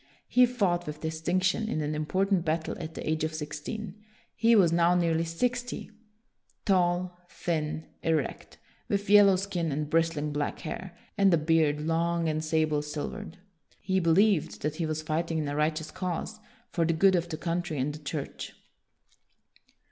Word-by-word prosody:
He 250 0 +5
fought 190 -8 0
with 150 0 -6
distinction 180 +6 0
in 155 - -1
an 150 0 -2
important 185 +4 +1
battle 160 0 -1
at 160 -1 -7
the - - -6
age 155 0 0
of 155 0 -2
sixteen. 175 +8 -6 0.3
He 230 0 +4
was 185 -6 +5
now 170 +1 +4
nearly 165 -2 +2
sixty, 245 +9 -2 0.7
tall, 180 -2 +2
thin, 155 -2 -2 0.2
erect, 160 -4 -2 0.3
with 200 0 0
yellow 205 -2 +8
skin 180 -4 -2
and 150 +1 -3
bristling 160 -2 +1
black 145 0 -2
hair, 175 +2 -6 0.2
and 195 -1 +5
a 170 - +5
beard 155 -1 +2
long 165 +1 0
and 155 0 -1
sable 155 -1 +1
silvered. 150 +6 -6 0.4
He 190 0 0
believed 185 +1 +2
that 150 +1 -2
he 165 - -1
was 155 0 -3
fighting 160 +1 -1
in 155 -2 -1
a 145 - -2
right 155 +1 +1
eous 160 - -9
cause, 185 +4 -4 0.3
for 170 - +1
the 165 +1 +2
good 190 +4 +4
of 170 -1 -1
the 155 - -4
country 170 -2 -2
and 140 +3 -1
the 150 - -8
Church. 150 -1 -5
165 Hz, 165 wpm, -28 LUFS, 155-185 Hz, 0.7 s, yellow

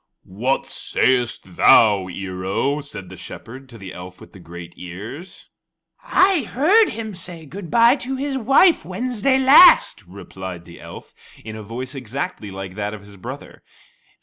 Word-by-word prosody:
"What 115 +9 -2
sayest 120 -8 -1
thou, 100 -4 +5
Ear 95 0 -7
o?" 135 +10 -1
said 140 -11 -8
the 95 - -10
Shepherd 130 +8 -11
to 115 - -12
the 95 -3 -10
elf 90 0 -11
with - - -16
the 95 - -13
great 85 0 -11
ears. 105 - -10 0.6
"I 385 -8 +3
heard 345 - +3
him 220 -1 -6
say 175 -3 -9
good 175 +3 -9
bye 235 - +4
to 265 0 -5
his 275 +1 -3
wife 275 - +4
Wednesday 255 +1 -1
last," 265 - +6
replied 95 -2 -9
the 85 -1 -14
elf - - -12 0.3
in 110 -1 -7
a 110 - -8
voice 120 +5 -7
exactly 135 - -6
like 95 -1 -8
that 105 +1 -4
of 105 - -12
his 100 0 -15
brother. 90 - -10
125 Hz, 160 wpm, -20 LUFS, -, 0.6 s, last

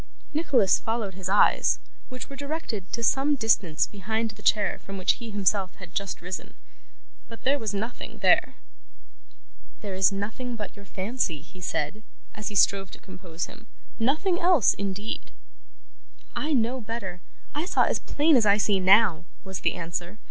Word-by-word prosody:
Nicholas 265 - +3
followed 225 -4 -2
his 185 0 -5
eyes, 205 +1 +4 0.3
which 255 0 -7
were 275 - -9
directed 280 - -4
to 235 - -2
some 275 +5 +3
distance 205 - +2
behind 220 +3 -2
the 210 0 -15
chair 205 -2 +2
from 195 0 -8
which 185 - +2
he 235 - -6
himself 200 -2 0
had 180 -3 -12
just 200 -2 -3
risen. 180 +1 -6 0.7
But, 230 - -11
there 280 +2 +2
was 220 -3 -2
nothing 215 +4 -5
there. - - +4 1.3
'This 190 -3 +2
is - - +2
nothing 220 +5 -4
but 210 -4 -6
your 200 -1 -13
fancy,' 190 - -2
he 180 +4 -15
said, 210 +4 -2 0.3
as 210 -1 -6
he 210 - -4
strove 195 -1 +3
to - - -11
compose 180 -3 -6
him; - - -14 0.3
'nothing 315 +10 +2
else, 345 - +5
indeed.' 200 +2 -4 1.1
'I 305 +1 -1
know 250 0 +1
better. 205 -6 -5 0.3
I 300 +3 -2
saw - - +3
as - - +1
plain 300 +1 +3
as 235 -4 +4
I 200 0 +6
see 205 -2 +2
now,' 185 -3 +5 0.2
was 190 -2 -5
the - - +1
answer. 175 +3 -5
210 Hz, 165 wpm, -26 LUFS, 190-240 Hz, 1.3 s, I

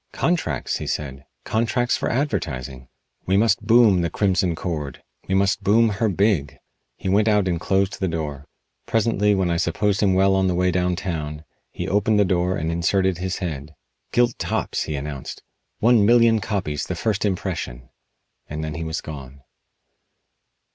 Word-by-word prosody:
"Contracts!" 160 - -1
he - - -6
said. 70 -2 -4 0.2
"Contracts 120 +2 0
for - - -2
advertising! 65 - -3 0.4
We 95 +1 +3
must 110 0 +3
boom 110 -5 +5
'The 85 - 0
Crimson 95 -3 +1
Cord.' 75 -6 -5 0.2
We 95 - 0
must 100 +1 +2
boom 115 +3 +4
her 110 +2 0
big!" 90 -8 +1 0.4
He - - -6
went 105 +3 +3
out 105 -3 +3
and 85 -2 -1
closed 95 +1 0
the 95 - 0
door. 75 -4 -4 0.4
Presently, 105 -2 +2
when 95 -3 0
I 85 - +1
supposed 100 +4 0
him 95 -3 +3
well 95 +1 +4
on 95 0 +2
the 90 - 0
way 90 +1 +2
down 90 0 0
town, 75 -5 -4 0.3
he - - -5
opened 105 +2 +2
the 100 - +4
door 90 0 0
and 80 0 -2
inserted 95 +2 +1
his 95 0 -2
head. 80 -4 -5 0.4
"Gilt 120 0 +2
tops," - - -2
he 75 - -3
announced. 70 -1 -6 0.3
"One 115 -1 +4
million 115 0 +5
copies 80 -9 -3
the 90 - -3
first 105 +3 -1
impression!" 90 - -3 0.6
And 75 +1 -5
then 75 -1 -4
he 80 +2 -4
was 80 0 -3
gone. 70 -3 -9
95 Hz, 170 wpm, -22 LUFS, 80-105 Hz, 0.6 s, boom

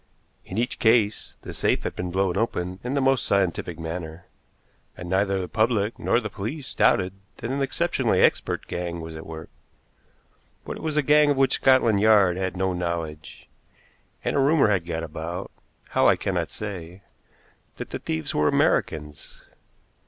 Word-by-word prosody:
In 95 - -7
each 120 +2 -1
case 110 -2 +2
the - - -7
safe - - 0
had - - -4
been 90 0 -3
blown 95 0 0
open 95 -4 -2
in 125 +3 -2
the 140 - +2
most 135 -2 +3
scientific 90 -4 0
manner, 80 0 -6 0.7
and 90 - -7
neither 95 +1 +1
the 90 - -3
public 110 0 0
nor - - +2
the 110 - -4
police 120 +8 -6
doubted 90 0 +3 0.2
that 115 - -4
an 140 +1 -1
exceptionally 135 -2 +1
expert - - +2
gang 85 -1 -4
was 80 0 -8
at 80 - -9
work; 80 0 -9 1.1
but - - -5
it - - -10
was 155 -1 -2
a 150 - +3
gang 150 +1 +5
of 145 - +2
which 135 0 +3
Scotland 120 -6 +4
Yard 105 -5 +5
had 95 -1 -3
no 95 0 0
knowledge, 85 -3 -5 0.8
and - - -1
a - - +3
rumor 140 -3 +4
had 90 -4 0
got 80 -1 -3
about 80 +3 -6 0.4
how, - - +3
I - - +6
cannot - - -2
say 95 -3 -7 0.7
that - - -7
the - - -4
thieves 80 -1 -3
were 75 0 +2
Americans. 75 -2 -1
95 Hz, 170 wpm, -25 LUFS, 85-120 Hz, 1.1 s, I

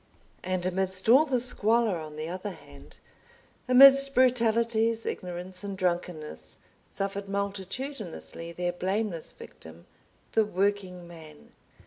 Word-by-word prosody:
And 185 -1 -2
amidst 190 +1 0
all 270 +6 +7
the 260 -4 0
squalor 230 -5 +2
on 155 -1 -9
the 155 +1 -5
other 185 +4 -5
hand, 145 -7 -14 0.7
amidst 275 +2 +8
brutalities, 230 -2 +2
ignorance, 180 +1 -5
and 200 -1 -5
drunkenness, 175 -4 -3 0.3
suffered 195 0 -3
multitudinously 200 - -5
their 175 +1 -2
blameless 190 -1 -3
victim, 80 +1 -13 0.5
the 220 - +3
Working 190 -3 -2
Man. 160 -3 -14
195 Hz, 110 wpm, -27 LUFS, 175-225 Hz, 0.7 s, amidst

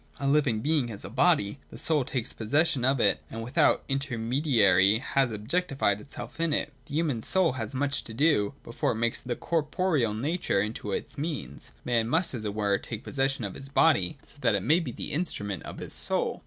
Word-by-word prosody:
— - - -23
A 140 - -1
living 140 -6 +2
being 150 -2 +2
has 105 -4 -7
a 100 - -8
body; 135 - +2
the - - -10
soul 155 -4 +2
takes 125 -2 -3
possession 135 +3 +1
of 135 +1 +2
it - - +3
and 115 0 -6
with 125 +4 -9
out - - +4
intermediary 120 - +3
has 135 +2 +1
objectified 115 - 0
itself 125 0 -9
in 165 -2 +1
it. - - -1
The 145 - -6
human 150 -8 0
soul 185 +6 +2
has 115 -2 -5
much 145 +1 0
to 110 - -8
do, 140 -4 +2
before 115 - -1
it - - -6
makes 115 +1 -1
its 120 -1 -4
corporeal 155 - 0
nature 145 - 0
into 105 0 -3
a - - -1 0.2
means. 140 - -5
Man 115 -2 +1
must, 160 +3 +2
as 110 -4 -4
it 105 -1 -3
were, 100 -2 +1
take 115 -2 -6
possession 135 -2 0
of 100 -3 -4
his 135 - -7
body, 160 +1 +3
so - - -17
that 115 -4 +3
it 100 - -1
may 160 +4 +4
be 155 -8 -4
the - - -6
instrument 105 - -2
of - - -8
his - - -2
soul. - - 0
130 Hz, 210 wpm, -28 LUFS, 110-150 Hz, 0.2 s, out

